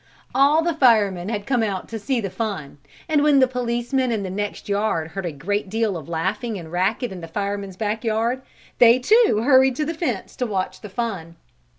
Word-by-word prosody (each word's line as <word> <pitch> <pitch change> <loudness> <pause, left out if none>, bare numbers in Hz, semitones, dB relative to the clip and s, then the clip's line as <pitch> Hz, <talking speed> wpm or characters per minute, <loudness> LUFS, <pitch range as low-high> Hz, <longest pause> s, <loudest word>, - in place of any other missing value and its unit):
] - - -31
All 285 +5 +4
the 340 0 +1
firemen 210 - +3
had 210 -3 -3
come 245 -1 +1
out 200 -4 -2
to 225 - -5
see 255 +4 -1
the 195 -4 -4
fun 195 -11 -4 0.3
and 305 -2 +2
when 295 -1 +4
the 260 - +5
policemen 250 +1 -1
in 215 -3 -1
the 185 - -4
next 205 +2 -4
yard 200 -6 0
heard 185 +2 -4
a - - -3
great 195 +8 -3
deal 220 -1 0
of 160 -2 -7
laughing 200 +7 -2
and 165 -3 -9
racket 195 +7 0
in 185 -2 -7
the 165 - -7
fireman's 200 +1 -4
back 215 +1 -2
yard, 230 +3 0 0.4
they 235 0 +7
too 380 - +3
hurried 265 -1 +5
to 300 - -1
the 330 - -2
fence 300 - -3
and 245 - 0
watched 190 -2 -3
the 210 - -8
fun. 190 -6 -4
215 Hz, 215 wpm, -22 LUFS, 190-250 Hz, 0.4 s, they